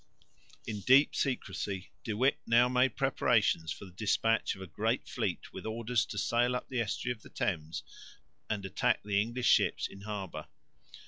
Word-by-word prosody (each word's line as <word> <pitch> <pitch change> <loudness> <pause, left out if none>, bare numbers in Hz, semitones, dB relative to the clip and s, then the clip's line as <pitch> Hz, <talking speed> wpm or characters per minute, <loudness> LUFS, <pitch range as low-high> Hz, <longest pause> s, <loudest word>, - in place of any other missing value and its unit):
In 105 -2 -4
deep 130 +7 +5
secrecy 100 -7 -2
De 110 - -3
Witt 130 +4 +3
now 120 +1 +5
made 125 -1 +2
preparations 80 0 +2
for - - -6
the 95 - -12
despatch 110 +3 +1
of 95 - -12
a - - -6
great 80 - -1
fleet - - -3
with - - -7
orders 115 +2 0
to 105 - -6
sail 120 +3 +2
up - - -4
the 125 -2 0
estuary 115 +3 -2
of 110 - -24
the - - -14
Thames 80 -3 -2 0.7
and 105 -2 -2
attack 110 +5 +1
the 100 -1 +2
English 120 +3 -3
ships - - +4
in 100 - -13
harbour. 100 -3 -5
110 Hz, 175 wpm, -31 LUFS, 100-125 Hz, 0.7 s, deep